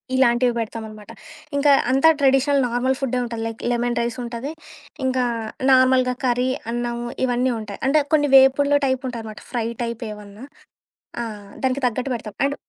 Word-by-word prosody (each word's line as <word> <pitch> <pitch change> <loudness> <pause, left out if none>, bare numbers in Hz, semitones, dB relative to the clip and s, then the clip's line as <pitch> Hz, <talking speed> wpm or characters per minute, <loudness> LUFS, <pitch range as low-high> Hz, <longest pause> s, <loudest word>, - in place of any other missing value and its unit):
ఇలాంటివి 245 -1 +3
పెడతామన్నమాట. 220 -1 -7 0.4
ఇంకా 285 +1 +4 0.2
అంతా 270 +5 +5
ట్రెడిషనల్ 275 +1 +3
నార్మల్ 250 +2 0
ఫుడ్డే 255 -2 -1
ఉంటాది. 230 -2 -5
లైక్ 225 0 -7
లెమన్ 240 0 -1
రైస్ 235 +1 -3
ఉంటాది. 240 +4 -5 0.5
ఇంకా 255 -1 +1 0.5
నార్మల్‌గా 255 -1 +4
కర్రీ, 250 +1 +1 0.2
అన్నము 240 0 -3 0.2
ఇవన్నీ 250 +1 +1
ఉంటాయి. 210 -2 -8
అంటే 300 +2 +4
కొన్ని 290 -2 +3
వేపుడ్లు 275 +2 +5
టైప్ 260 0 -1
ఉంటాదనమాట. 220 -3 -8
ఫ్రై 240 -2 -1 0.2
టైప్ 235 0 -4
ఏవన్నా. 210 +3 -11 0.8
ఆహ్, 210 -3 -8
దానికి 260 +1 +1
తగ్గట్టు 250 +3 -2
పెడతాం. 220 -2 -7
అండ్ 280 +1 0
245 Hz, 145 wpm, -22 LUFS, 230-265 Hz, 0.8 s, అంతా